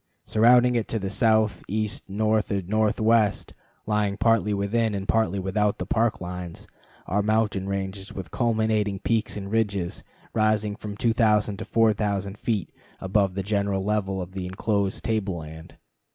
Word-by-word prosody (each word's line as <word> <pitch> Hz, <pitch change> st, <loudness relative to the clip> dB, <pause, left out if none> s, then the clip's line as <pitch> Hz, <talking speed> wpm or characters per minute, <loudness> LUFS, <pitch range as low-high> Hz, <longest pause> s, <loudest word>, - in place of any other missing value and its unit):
Surrounding 120 Hz, +3 st, +5 dB
it 115 Hz, -3 st, -1 dB
on -, -, +1 dB
the 95 Hz, 0 st, -3 dB
south, 110 Hz, -3 st, +2 dB
east, 105 Hz, 0 st, -2 dB
north, 110 Hz, +1 st, +1 dB
and 95 Hz, -3 st, -2 dB
northwest, 110 Hz, 0 st, +2 dB, 0.3 s
lying 105 Hz, -1 st, 0 dB
partly 110 Hz, -1 st, +2 dB
within 105 Hz, +2 st, 0 dB
and 100 Hz, 0 st, -4 dB
partly 105 Hz, -4 st, +1 dB
without 100 Hz, +2 st, 0 dB
the -, -, -4 dB
Park 115 Hz, 0 st, +1 dB
lines, 90 Hz, -1 st, -7 dB, 0.4 s
are 105 Hz, +3 st, 0 dB
mountain 105 Hz, -2 st, 0 dB
ranges 95 Hz, 0 st, -4 dB
with 95 Hz, -3 st, -7 dB
culminating 110 Hz, -4 st, +1 dB
peaks 110 Hz, +2 st, -1 dB
and 100 Hz, -1 st, -6 dB
ridges 100 Hz, -6 st, -1 dB, 0.3 s
rising 110 Hz, -1 st, +1 dB
from 105 Hz, -1 st, -7 dB
2000 110 Hz, -3 st, +2 dB
to -, -, -6 dB
4000 105 Hz, -3 st, +1 dB
feet 110 Hz, -7 st, -2 dB, 0.3 s
above 95 Hz, -1 st, +1 dB
the 95 Hz, -, -2 dB
general 100 Hz, -1 st, 0 dB
level 95 Hz, -2 st, -1 dB
of 90 Hz, -, -11 dB
the 95 Hz, -1 st, -5 dB
inclosed 100 Hz, +1 st, -1 dB
table 105 Hz, -5 st, -1 dB
land. 80 Hz, 0 st, -10 dB
105 Hz, 150 wpm, -25 LUFS, 95-110 Hz, 0.4 s, Surrounding